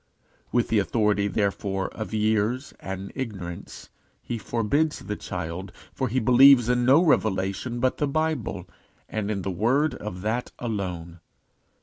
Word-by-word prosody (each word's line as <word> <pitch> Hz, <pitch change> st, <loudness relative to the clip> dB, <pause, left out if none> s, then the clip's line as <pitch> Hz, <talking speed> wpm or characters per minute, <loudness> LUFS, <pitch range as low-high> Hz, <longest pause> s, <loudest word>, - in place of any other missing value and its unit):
With 120 Hz, -1 st, +1 dB
the 110 Hz, -, +3 dB
authority, 105 Hz, -1 st, +1 dB
therefore, 100 Hz, -2 st, -1 dB
of 110 Hz, -4 st, -6 dB
years 110 Hz, +4 st, 0 dB
and 95 Hz, 0 st, -6 dB
ignorance, 95 Hz, -10 st, -7 dB, 0.3 s
he 120 Hz, -, -4 dB
forbids 130 Hz, +9 st, 0 dB
the 105 Hz, -, -4 dB
child, 90 Hz, 0 st, -5 dB, 0.2 s
for 130 Hz, -, -1 dB
he 125 Hz, +3 st, 0 dB
believes 125 Hz, 0 st, +7 dB
in 125 Hz, 0 st, +2 dB
no 140 Hz, +7 st, +6 dB
revelation 105 Hz, -, +1 dB
but 130 Hz, +1 st, +1 dB
the 145 Hz, -, 0 dB
Bible, 140 Hz, -, -2 dB, 0.4 s
and 105 Hz, -1 st, -3 dB
in 100 Hz, -3 st, -2 dB
the 95 Hz, -, -2 dB
word 125 Hz, -, +2 dB
of 95 Hz, -4 st, -6 dB
that 110 Hz, +4 st, -2 dB
alone. 90 Hz, -7 st, -4 dB
110 Hz, 140 wpm, -25 LUFS, 95-125 Hz, 0.4 s, believes